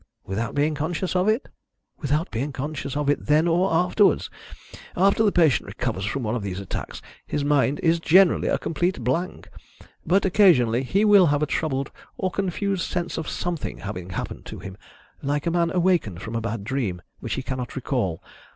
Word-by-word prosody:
"Without 105 +4 -3
being 150 +2 +2
conscious 160 +5 -2
of 180 +2 +2
it?" 220 +5 +1 0.5
"Without 150 +3 -1
being 135 +6 -2
conscious 145 0 -4
of 150 -1 -1
it 145 - 0
then 155 +3 +4
or 175 +3 +2
afterwards. 180 +5 +3 0.7
After 195 +4 +4
the 215 -2 +4
patient 160 -8 +3
recovers 95 - -3
from 125 +5 -2
one 110 0 -1
of 120 - -2
these 95 -2 -4
attacks 100 - -6 0.2
his 145 - -1
mind 145 -1 +2
is 165 0 +3
generally 180 +3 +4
a - - +2
complete 175 -3 -1
blank, 150 +10 -2 0.6
but 195 +3 +2
occasionally 150 - +4
he 195 +11 +1
will 200 -4 +7
have 145 0 +1
a - - +3
troubled 140 -3 -2 0.3
or 185 -1 -1
confused 195 0 -1
sense 175 -1 -2
of 160 - -4
something 175 -3 -3
having 95 -3 -6
happened 90 - -5
to - - -7
him 95 -1 -8 0.5
like 145 +1 -1
a 170 - +1
man 170 -1 +2
awakened 175 - +1
from 115 +1 -5
a 115 - -1
bad 115 -2 -3
dream, 105 -7 -2 0.2
which - - -3
he - - -4
cannot 130 -2 -4
recall. 125 - -2
150 Hz, 185 wpm, -24 LUFS, 125-175 Hz, 0.7 s, will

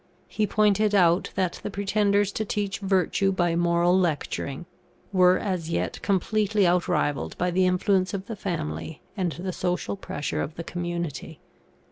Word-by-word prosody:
He 215 -1 -1
pointed 210 0 +3
out 175 -2 +4
that 185 -2 -1
the - - -4
pretenders 200 0 +1
to 215 - -2
teach 205 -2 -2
virtue 195 0 +1
by 175 -3 +1
moral 170 +1 +3
lecturing, 165 -3 -1 0.5
were 185 -1 +5
as 180 -5 -3
yet - - -2
completely 205 +2 +1
outrivalled 175 -5 0
by 180 +1 0
the 185 +1 +3
influence 185 0 +2
of 195 -1 -4
the 225 - -5
family 160 -4 -4
and 180 -6 -1
the 185 +1 -5
social 180 +2 -2
pressure 170 -6 -4
of 155 - -4
the 170 - -5
community. 170 -3 -5
185 Hz, 150 wpm, -26 LUFS, 175-200 Hz, 0.5 s, were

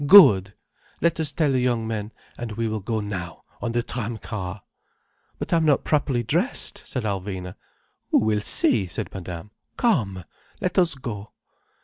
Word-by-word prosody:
Good! 105 - +8 0.4
Let 170 -1 +1
us 160 -2 0
tell 155 -4 +2
the 130 - +2
young 120 -2 +1
men, 110 -1 -3 0.2
and 120 -2 -5
we 115 +1 -1
will 110 0 -2
go 110 +2 -2
now, 90 -5 -5 0.2
on 115 - -2
the 120 0 +1
tram 120 -2 -3
car." 100 -3 -5 0.7
"But - - -3
I - - +6
am 165 - +2
not 150 -2 +3
properly 140 -5 +1
dressed," - - 0
said 125 - -3
Alvina. 95 -3 -3 0.6
"Who - - +4
will 110 -1 +2
see?" 100 -1 +4
said 85 - -5
Madame. 90 +1 -7 0.3
"Come, 110 - +1 0.4
let 185 -2 +1
us 170 -4 +4
go." 115 -5 -6
110 Hz, 165 wpm, -24 LUFS, 100-130 Hz, 0.7 s, Good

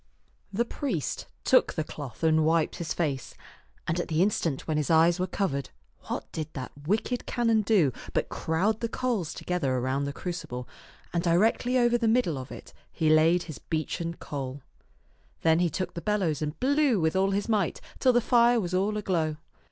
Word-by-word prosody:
The 230 +4 0
priest 235 - -3 0.2
took - - +4
the 155 - 0
cloth 145 -2 -8
and 160 -1 +4
wiped 160 0 +2
his 170 -2 -4
face, 140 -7 -2 0.5
and 165 +2 0
at - - -2
the 160 +2 +2
instant 170 -8 -1
when 155 -2 0
his 150 - -1
eyes 165 +2 +5
were 185 - 0
covered, 150 -8 -2 0.4
what - - -3
did 155 -1 -5
that 130 -3 -6 0.2
wicked 225 +5 0
canon 230 -3 +2
do 195 - +3 0.2
but - - 0
crowd 195 +7 0
the 230 - -2
coals 230 -10 -1
together 160 -8 -1
around 130 +3 0
the 140 - -2
crucible, 140 -7 -5 0.5
and 170 - +1
directly 215 +8 +2
over 240 -1 +3
the 230 - +1
middle 220 - +2
of 130 - -8
it - - -10 0.2
he 155 -2 +1
laid 165 +3 +4
his 155 - -8
beechen 165 +1 -3
coal. 135 -3 -6 0.8
Then 160 0 +4
he 175 -1 +2
took 180 +3 -3
the 170 - -5
bellows 180 -6 0
and 150 0 -3
blew 275 -3 +3
with 160 +1 +1
all 190 +1 +3
his 200 +1 -1
might 210 -6 +1 0.2
till 255 - +5
the 240 0 +3
fire 240 0 +4
was 180 -4 -3
all 200 +3 +1
aglow. 165 -7 0
170 Hz, 185 wpm, -28 LUFS, 155-210 Hz, 0.8 s, eyes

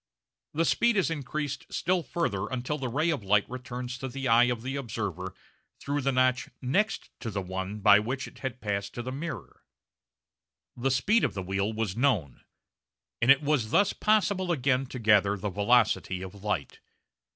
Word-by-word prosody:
The 165 +2 +2
speed 235 +6 +3
is 185 -4 +2
increased 145 -1 -4
still 180 +1 +1
further 130 - -2
until 130 +4 -3
the 130 -2 -3
ray 155 +7 +1
of 145 -9 -3
light 100 +1 +3
returns 125 0 -6
to 135 - -4
the 135 +1 -4
eye 120 +1 +6
of 120 -2 -2
the 135 +2 -3
observer 100 - -4 0.4
through 145 +1 -2
the 135 +1 +1
notch 130 -1 +2
next 195 +12 0
to 115 - -4
the 100 -2 -3
one 95 +2 -5
by 105 +1 +7
which 130 +5 -3
it - - -14
had 130 -2 -5
passed 100 -2 -3
to 120 - -4
the 130 - -4
mirror! 155 +5 -6 1.1
The 125 +2 0
speed 190 - +2
of - - 0
the 95 - -3
wheel 95 +3 -1
was 110 -3 -2
known, 110 - 0 0.8
and 115 - +2
it 140 +1 +7
was 140 -7 +1
thus 200 - +3
possible 200 -3 +1
again 135 -3 +1
to 125 - -7
gather 105 -3 +4
the 100 +1 -3
velocity 100 -2 +2
of 95 +1 -10
light. 105 -9 -2
125 Hz, 180 wpm, -28 LUFS, 105-140 Hz, 1.1 s, by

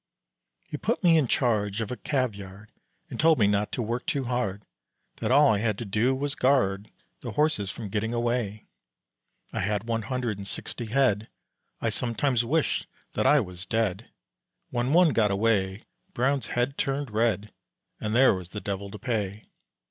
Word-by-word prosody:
He 150 - -6
put 220 +7 -1
me 170 -2 +6
in 155 -5 +3
charge 105 -5 +1
of 115 0 -3
a - - -2
cavyard, 105 -7 -3 0.4
And - - -6
told 160 0 +5
me 105 - +4
not 105 +1 +1
to 120 - -1
work 120 +3 -3
too 140 - 0
hard, 120 -5 -2 0.5
That - - -2
all 140 +2 +6
I 105 - +3
had 110 -2 0
to 120 - -5
do 110 +6 +1
was 140 +1 -2
guard 125 -8 +2 0.3
The - - -6
horses 150 -10 +1
from 105 0 -6
getting 110 +3 -1
away; 120 -3 -1 0.9
I - - -2
had 105 -1 0
one 115 -1 -1
hundred 115 -2 -2
and 100 - -6
sixty 120 +3 -4
head, 110 -3 +2 0.5
I - - 0
sometimes 120 +1 0
wished 150 +6 0 0.3
that - - +1
I - - +6
was 90 +1 -7
dead; 110 0 -1 0.6
When 120 +1 0
one 175 +1 +6
got 110 -7 +2
away, 100 -1 +1 0.3
Brown's 135 +2 +1
head 125 +3 -1
turned 135 -2 -1
red, 105 -1 0 0.5
And 110 +1 -2
there 130 +2 +6
was 90 -2 -5
the 105 - -5
devil 100 -1 -4
to 105 - -8
pay. 105 -4 -3
115 Hz, 175 wpm, -27 LUFS, 100-130 Hz, 0.9 s, me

